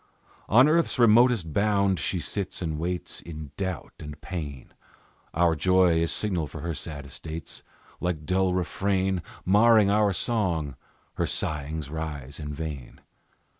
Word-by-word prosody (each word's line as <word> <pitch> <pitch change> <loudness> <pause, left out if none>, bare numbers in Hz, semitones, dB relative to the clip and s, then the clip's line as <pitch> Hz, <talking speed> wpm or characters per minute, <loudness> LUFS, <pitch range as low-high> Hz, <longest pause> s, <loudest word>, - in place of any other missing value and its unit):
On 125 +7 +7
earth's 165 0 +2
remotest 115 - +4
bound 100 -3 +2
she 90 +5 -1
sits 95 +5 -3
and 80 -2 -2
waits 90 +2 -3
In 75 -4 -8
doubt 95 -5 -4
and 75 -1 -8
pain; 75 -7 -6 0.6
Our 85 0 +3
joy 90 +1 +4
is 85 -1 +1
signal 90 -7 0
for 75 - -8
her 85 +1 -3
sad 75 -1 -6
estates; 80 +4 -7 0.4
Like 85 -4 -2
dull 95 +2 +1
refrain 95 0 0 0.2
Marring 105 +1 +5
our 105 -1 +3
song, 90 - -1 0.4
her - - +1
sighings 75 -1 -3
rise 75 -4 -5
in 75 -1 -5
vain. 75 -4 -6
85 Hz, 135 wpm, -26 LUFS, 75-100 Hz, 0.6 s, On